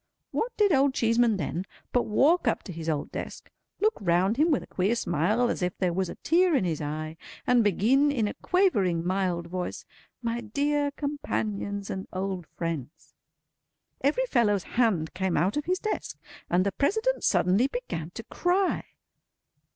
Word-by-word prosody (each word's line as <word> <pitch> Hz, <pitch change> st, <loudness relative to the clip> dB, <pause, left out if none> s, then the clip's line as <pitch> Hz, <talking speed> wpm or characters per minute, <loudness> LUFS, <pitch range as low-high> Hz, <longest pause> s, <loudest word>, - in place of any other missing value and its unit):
What 485 Hz, -, -1 dB
did 415 Hz, -2 st, +4 dB
Old 275 Hz, -1 st, +3 dB
Cheeseman 230 Hz, -1 st, +3 dB
then, 180 Hz, -1 st, -2 dB, 0.3 s
but 245 Hz, -, +2 dB
walk 295 Hz, +11 st, +3 dB
up -, -, +1 dB
to 185 Hz, -, -7 dB
his 165 Hz, 0 st, -4 dB
old 150 Hz, -2 st, -2 dB
desk, -, -, -7 dB, 0.3 s
look 435 Hz, +1 st, +3 dB
round 185 Hz, +4 st, +2 dB
him 310 Hz, +4 st, +4 dB
with 290 Hz, -, +2 dB
a -, -, -10 dB
queer 195 Hz, +5 st, 0 dB
smile 205 Hz, +5 st, +1 dB
as 240 Hz, -, -2 dB
if 180 Hz, 0 st, -1 dB
there 180 Hz, -2 st, 0 dB
was 185 Hz, 0 st, -1 dB
a -, -, -6 dB
tear 350 Hz, 0 st, +3 dB
in 265 Hz, -, +2 dB
his 165 Hz, -4 st, -1 dB
eye, 155 Hz, +2 st, -4 dB, 0.3 s
and 245 Hz, -2 st, +4 dB
begin 235 Hz, -, +3 dB
in 230 Hz, -7 st, 0 dB
a -, -, -3 dB
quavering, 205 Hz, -, +1 dB
mild 180 Hz, -2 st, 0 dB
voice, 180 Hz, +1 st, -5 dB, 0.4 s
"My 235 Hz, 0 st, -1 dB
dear 285 Hz, +6 st, 0 dB
companions 215 Hz, -9 st, -3 dB
and 190 Hz, 0 st, -5 dB
old 185 Hz, -2 st, -3 dB
friends!" 165 Hz, -3 st, -6 dB, 0.9 s
Every 300 Hz, -, +2 dB
fellow's 210 Hz, -, +2 dB
hand 210 Hz, -10 st, +1 dB
came 190 Hz, -1 st, 0 dB
out 190 Hz, +3 st, +1 dB
of 295 Hz, -, -1 dB
his 365 Hz, +1 st, +1 dB
desk, 430 Hz, +2 st, -3 dB, 0.3 s
and 180 Hz, +2 st, +2 dB
the 200 Hz, -, +1 dB
President 440 Hz, -, 0 dB
suddenly 195 Hz, +8 st, +3 dB
began -, -, -5 dB
to -, -, -6 dB
cry. 365 Hz, +2 st, 0 dB
215 Hz, 170 wpm, -27 LUFS, 180-285 Hz, 0.9 s, did